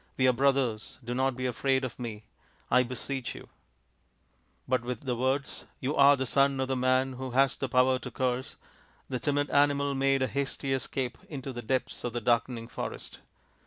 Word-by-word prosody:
We 130 - +4
are 130 - +5
brothers. 130 -4 +1
Do 120 +1 -3
not 130 0 +1
be 130 +1 -3
afraid 130 +2 +1
of 130 -1 -5
me, 110 -3 -5 0.5
I 125 - +6
beseech 125 +1 -3
you." - - -11 1.2
But 130 -1 +2
with 125 -1 -4
the 130 -3 -2
words, 130 +3 -1
" - - -39
You 135 +3 -1
are 140 +1 +7
the 130 - -1
son 135 +1 +3
of 130 0 -1
the 130 - +1
man 130 +1 +2
who 130 +1 -5
has 135 -1 +4
the 135 - -3
power 130 +1 +4
to - - -7
curse," 130 0 -2 0.5
the 125 - -2
timid 145 +1 0
animal 140 0 +3
made 135 0 +2
a - - +1
hasty 140 0 -2
escape 130 -1 -2
into 135 -3 -5
the 120 - -5
depths 130 +3 -2
of 120 - -3
the 120 - -2
darkening 115 0 +1
forest. - - -6
130 Hz, 195 wpm, -29 LUFS, 125-135 Hz, 1.2 s, are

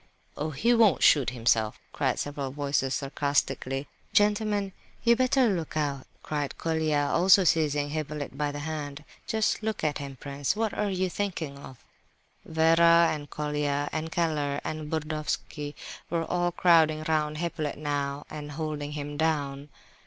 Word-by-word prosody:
"Oh, 155 +2 -2
he 220 - +2
won't 225 -7 +4
shoot 140 -6 +5
himself!" 115 -3 +1
cried - - 0
several 145 -2 -3
voices, 140 -1 -1
sarcastically. 140 -1 -1 0.3
"Gentlemen, 205 -1 +2 0.3
you'd 235 0 +4
better 255 0 +4
look 165 -5 -2
out," 140 -3 -2 0.2
cried 145 -2 -3
Colia, 155 -3 +1
also 185 +2 +6
seizing 150 -3 +2
Hippolyte 150 -2 -4
by 145 +1 -1
the 145 - -6
hand. 150 -1 -5 0.2
"Just 220 0 +1
look 220 0 -3
at 150 -2 0
him! 140 -1 -6
Prince, 140 +2 -2
what 220 0 -1
are 210 -1 -1
you 185 -1 0
thinking 170 -7 -3
of?" 130 -3 -12 0.6
Vera 165 +1 +5
and 145 -1 -5
Colia, 150 -1 -1
and 160 +1 -3
Keller, 155 -5 0
and 155 -1 -4
Burdovsky 150 -1 -3 0.3
were 165 -1 -1
all 175 0 0
crowding 160 -3 +4
round 155 -1 0
Hippolyte 165 -3 -3
now 145 -1 -2
and 150 -1 -7
holding 150 -1 -4
him 145 0 -5
down. 145 -3 -1
150 Hz, 145 wpm, -28 LUFS, 145-170 Hz, 0.6 s, also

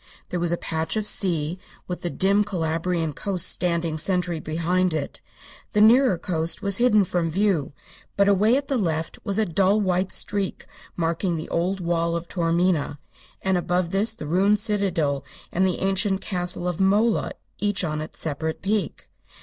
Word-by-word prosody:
There 180 - -2
was 170 -1 0
a 175 - +1
patch 160 +1 -2
of 215 - -1
sea, 175 -4 0 0.3
with 180 - -5
the 175 - -2
dim 200 +4 +2
Calabrian 165 -3 -1
coast 185 -1 -1
standing 170 -3 0
sentry 180 -1 +1
behind 170 +3 0
it. 145 -3 -4 0.5
The 210 - +2
nearer 235 -2 +6
coast 165 -1 -1
was 200 -1 +2
hidden 225 -4 +4
from 175 -2 -1
view, 180 -5 0 0.4
but 200 0 +4
away 210 +5 +4
at 280 0 -3
the 270 -3 0
left 165 -4 -2
was 200 0 -1
a 220 - +3
dull 195 +4 +2
white 185 -1 0
streak 200 -1 -2 0.3
marking 170 +1 0
the 155 - -5
old 185 +3 -1
wall 170 -1 0
of 170 0 -4
Taormina, 170 -3 0 0.5
and 190 -1 +2
above 175 0 -1
this 210 +3 +1
the 150 - -7
ruined 195 +6 +3
citadel 190 - 0 0.3
and 190 +2 +2
the 180 - -1
ancient 195 0 +1
castle 180 -2 -2
of 175 -2 -2
Mola 210 +4 +2 0.3
each 205 -2 0
on 155 -2 -2
its 155 - -8
separate 160 +1 -2
peak. 205 +1 -2
180 Hz, 170 wpm, -24 LUFS, 165-200 Hz, 0.5 s, nearer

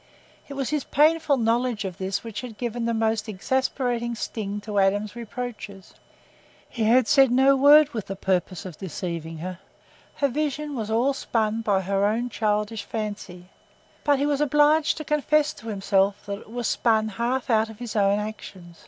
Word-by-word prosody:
It 280 - -8
was 275 -1 -2
his 300 -3 0
painful 305 -1 +3
knowledge 230 -2 0
of 185 -3 -6
this 190 +1 -2
which 225 -3 -6
had 240 -4 -9
given 240 -1 -3
the 235 - 0
most 220 -1 0
exasperating 240 +2 -1
sting 210 -3 -4
to 205 -1 -2
Adam's 205 +2 +1
reproaches. 225 -4 -7 0.7
He 230 -3 -2
had 245 +3 +4
said 275 -4 +5
no 265 +3 +4
word 290 +2 +7
with 225 -8 -5
the 195 - -4
purpose 185 -2 -1
of 175 -5 -9
deceiving 165 -2 -5
her—her 185 - -6
vision 295 +1 -3
was 220 -3 -4
all 240 +5 +2
spun 225 -4 -1
by 200 -3 +1
her 195 +1 0
own 235 +4 -1
childish 210 -1 -1
fancy—but 210 +6 -5
he 280 - 0
was 290 -1 0
obliged 295 +2 +3
to 310 - -5
confess 300 0 +1
to 225 - -13
himself 195 -1 0
that 200 -1 -5
it - - -16
was 240 +1 -4
spun 220 -2 +2
half 240 +5 -2
out 220 0 +3
of 220 - -11
his 235 -2 -7
own 200 -1 +3
actions. 190 -5 -8
225 Hz, 170 wpm, -24 LUFS, 200-260 Hz, 0.7 s, word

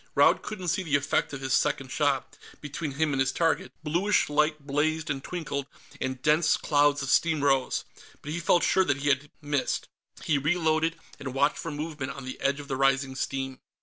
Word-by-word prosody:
Raud - - +5
couldn't 185 -5 -4
see 190 - +1
the 155 -6 0
effect 140 0 +1
of 135 -2 -6
his 135 0 -1
second 135 -3 +1
shot 140 -1 0 0.2
between 145 0 -5
him 150 +1 0
and 135 - 0
his 135 0 +2
target, 165 +2 0
blueish 175 +7 +2
light 150 0 +1
blazed 150 +2 0
and 135 -1 -4
twinkled, 150 -6 -4 0.3
and 130 0 -2
dense 155 +2 +4
clouds 145 -1 +2
of 135 - -4
steam 160 -2 +3
rose 135 -2 +2 0.4
but 150 - -5
he 170 - -2
felt 170 +1 +3
sure 190 - +4
that 145 -6 +1
he 145 - +2
had 140 +1 +1
missed. 145 -2 -1 0.3
He 150 -3 +2
reloaded, 160 +1 +1 0.2
and 130 -2 -6
watched 140 - +2
for 165 - -4
movements 150 -3 -5
on 135 -2 -8
the 130 - -7
edge 140 +1 +1
of 145 - -8
the 135 - -2
rising 135 0 +2
steam. 135 -1 -3
145 Hz, 200 wpm, -27 LUFS, 135-160 Hz, 0.4 s, Raud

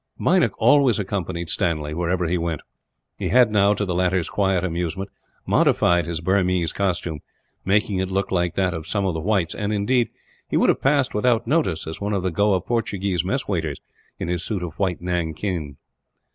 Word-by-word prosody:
Meinik - - +3
always 140 -5 +4
accompanied 95 -4 -3
Stanley, 80 -5 -1
wherever 90 +2 0
he 85 +2 0
went. 85 -3 -2 0.6
He - - -2
had 125 -3 +5
now, 105 0 +4
to 105 - -1
the 90 - -2
latter's 90 -1 +1
quiet 95 -3 +1
amusement, 90 +2 -3 0.3
modified 85 -2 +3
his 85 -2 -3
Burmese 90 -2 +1
costume; 85 -5 -1 0.4
making 100 0 +1
it 95 0 -1
look 95 +1 -1
like 90 -2 0
that 95 -2 +1
of 80 -2 -6
some 100 -2 0
of 95 - 0
the 80 - -3
whites 90 -1 0
and, 105 0 -3
indeed, 115 +3 +1 0.4
he - - +1
would - - +3
have - - +2
passed 135 -1 +2
without 115 +2 +2
notice 120 - 0
as 80 +4 -7
one 100 +1 -1
of 95 -3 -1
the 95 - 0
Goa 100 +1 +2
Portuguese 100 -5 -1
mess 130 +9 -2
waiters, 80 -8 -2 0.4
in - - -4
his 85 -1 -2
suit 100 -5 -2
of 85 - -7
white 95 -4 0
nankeen. 85 -3 -3
95 Hz, 185 wpm, -23 LUFS, 85-105 Hz, 0.6 s, had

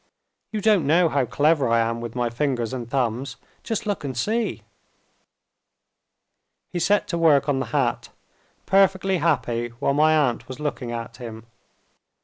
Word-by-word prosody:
You 215 -1 -3
don't 200 -8 +3
know 165 +2 +4
how 140 -4 0
clever 145 +1 +2
I 115 0 +3
am 115 0 -1
with 120 0 -7
my 120 -1 -1
fingers 125 -2 -1
and 120 -3 -5
thumbs. 130 +1 -1 0.3
Just 225 -1 -3
look 205 -6 -2
and 130 -3 -4
see!" 220 - -1 2.1
He 175 - -1
set 200 +4 +2
to 170 - -1
work 150 -4 +4
on 140 -2 +1
the 135 - -3
hat; 130 -1 -1 0.6
perfectly 195 -1 +3
happy 125 -8 0
while 140 - 0
my 155 +2 +4
aunt 130 -6 0
was 130 +2 -8
looking 135 -5 -3
at 115 -1 -6
him. 115 -2 -9
140 Hz, 155 wpm, -23 LUFS, 120-165 Hz, 2.1 s, know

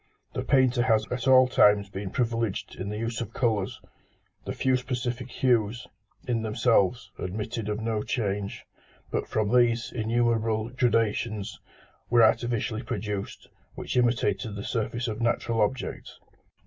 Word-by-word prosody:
The - - -2
painter 130 -3 +3
has 115 -3 +3
at 125 +2 -2
all 130 -1 +7
times 105 -5 +4
been 95 0 -5
privileged 115 -2 -2
in 95 +2 -5
the 105 - -4
use 115 +1 -3
of 115 - -6
colours. 110 -6 0 0.7
The - - -3
few 130 -1 +1
specific 125 -1 -3
hues, 120 -2 +1 0.4
in 120 -2 0
themselves, 110 +1 +1
admitted 105 +3 -4
of 105 0 -2
no 110 -1 -1
change; 100 -4 -3 0.5
but - - -1
from 110 -1 0
these, 120 -1 +3
innumerable 115 -1 0
gradations 115 -3 0 0.5
were 120 -1 +6
artificially 115 0 +1
produced 105 -5 -5 0.3
which - - -5
imitated 110 -4 +1
the 100 - -5
surface 120 +2 -2
of 110 +1 -4
natural 115 -1 +1
objects. 115 +5 -2
115 Hz, 135 wpm, -27 LUFS, 105-120 Hz, 0.7 s, all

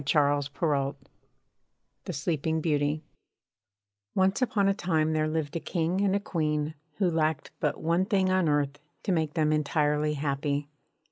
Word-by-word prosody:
she 150 +3 +1
murmured_ 145 -1 +1
(126) 140 -4 0 1.1
THE 180 - -4
SLEEPING 160 +1 -1
BEAUTY 150 -1 0 1.1
Once 190 +4 +2
upon 205 -5 +2
a 195 - +4
time 160 -5 +1
there 155 0 +1
lived 155 0 -2
a - - 0
King 175 +3 -1
and 200 -1 +2
a - - +2
Queen, 155 -5 -1 0.2
who 195 - +2
lacked 160 -3 0
but 150 -2 0
one 170 +3 +1
thing 190 -2 +2
on 185 -4 +3
earth 145 -1 0 0.2
to 200 - 0
make 160 -3 0
them 155 -2 +2
entirely 150 0 +1
happy. 140 0 -1
155 Hz, 155 wpm, -28 LUFS, 145-175 Hz, 1.1 s, a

